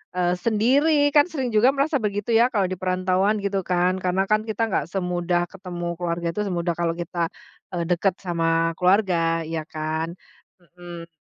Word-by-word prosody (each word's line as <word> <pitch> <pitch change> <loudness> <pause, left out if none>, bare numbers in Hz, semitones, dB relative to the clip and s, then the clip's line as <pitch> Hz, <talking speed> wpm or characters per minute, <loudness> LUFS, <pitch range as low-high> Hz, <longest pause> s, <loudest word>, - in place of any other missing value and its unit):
eee, 180 0 +1
sendiri 250 +8 +3 0.2
kan 290 - +7
sering 265 -5 -2
juga 225 +4 +5
merasa 285 +2 +1
begitu 205 +2 -3
ya - - +6
kalau 200 -5 +1
di - - -1
perantauan 185 +3 +1
gitu 200 -1 0
kan. 180 0 +3
Karena 185 +1 +1
kan 215 0 +4
kita 220 - -3
nggak 150 - 0
semudah 175 -2 0
ketemu 180 -3 -7
keluarga 170 0 -2
itu 210 - -1
semudah 170 -2 -1
kalau 170 -1 +1
kita, 175 +1 -8 0.5
eee, 175 -2 -2
deket 180 +2 +2
sama 165 -2 0
keluarga, 190 0 +3 0.3
iya 160 -1 -3
kan? 155 +1 -2 0.5
Mhm. 175 -1 -11
180 Hz, 165 wpm, -23 LUFS, 170-200 Hz, 0.5 s, kan